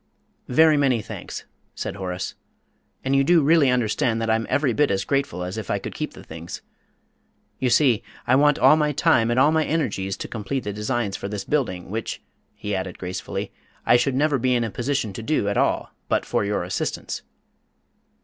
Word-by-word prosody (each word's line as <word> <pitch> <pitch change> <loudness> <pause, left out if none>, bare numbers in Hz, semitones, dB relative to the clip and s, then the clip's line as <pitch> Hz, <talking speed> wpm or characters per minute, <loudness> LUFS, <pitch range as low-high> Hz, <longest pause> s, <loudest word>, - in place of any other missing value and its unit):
"Very 155 +3 +5
many 135 -4 +3
thanks," - - -7 0.3
said - - -4
Horace. 90 -1 -4 0.7
"And 135 +1 +2
you 135 - +4
do 165 +1 +4
really 150 -2 +5
understand 115 -1 +1
that 115 0 0
I'm 110 0 +1
every 130 -1 +2
bit 150 +4 +2
as 95 0 0
grateful 140 -10 -1
as 90 +4 -4
if 105 - -7
I - - +1
could - - -6
keep - - -4
the - - -12
things? 80 +1 -8 1.0
You 130 - +1
see, 125 -4 +4 0.2
I 125 - +4
want 145 +1 +4
all 155 - +6
my 150 -1 +1
time 115 -3 +3
and 120 +2 +2
all 145 +3 +5
my 160 0 +3
energies 110 -13 -1
to - - -5
complete 115 +4 -3
the 105 - -4
designs 105 -1 -2
for - - -5
this 105 -1 -4
building, 95 -12 -1
which," 110 +1 -3 0.4
he 105 - -4
added 95 -1 -4
gracefully, 90 0 -4 0.3
"I - - +6
should 125 +2 +2
never 145 0 +2
be 125 +1 +2
in 120 - +1
a 115 - -3
position 120 -4 -1
to 105 - -6
do 115 -3 0
at 100 - 0
all, - - +1 0.2
but - - +1
for - - 0
your 100 -2 -1
assistance." 90 +1 -3
120 Hz, 195 wpm, -23 LUFS, 100-140 Hz, 1.0 s, all